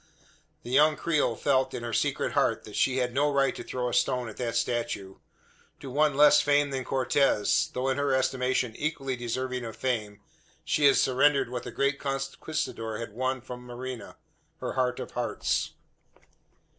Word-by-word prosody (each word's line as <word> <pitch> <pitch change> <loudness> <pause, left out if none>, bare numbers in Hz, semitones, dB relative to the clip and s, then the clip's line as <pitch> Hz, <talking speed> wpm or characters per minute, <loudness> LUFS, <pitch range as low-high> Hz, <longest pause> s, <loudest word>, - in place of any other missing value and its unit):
The 120 - -7
young 150 +3 +5
creole 155 -1 +1
felt, 130 -2 +1
in 120 - -5
her 120 -1 -4
secret - - 0
heart, - - +1
that - - -10
she 130 0 +2
had 125 -2 0
no 145 +2 +2
right 140 -1 +2
to - - -6
throw 125 -1 -3
a 120 - -3
stone 125 -2 +1
at 110 - -11
that 120 -2 -3
statue. 115 -5 -2 0.6
To 135 - -8
one 145 0 +2
less 150 0 +7
famed 145 -1 +2
than 130 -1 -2
Cortez 130 -3 +2
though 130 +1 -1
in 135 0 +1
her 145 -1 +1
estimation 130 -2 0
equally 140 -4 -2
deserving 125 +1 -3
of 115 -2 -6
fame 110 -6 -2 0.5
she 150 - +2
had 140 - +7
surrendered 135 0 +3
what 125 -1 -3
the - - -6
great 140 0 0
conquistador 135 -4 -3
had 115 -2 -6
won 130 +2 -1
from 125 0 -8
Marina 125 0 -7 0.4
her - - -4
heart 125 -1 0
of - - -6
hearts. - - -1
130 Hz, 175 wpm, -28 LUFS, 120-140 Hz, 0.6 s, less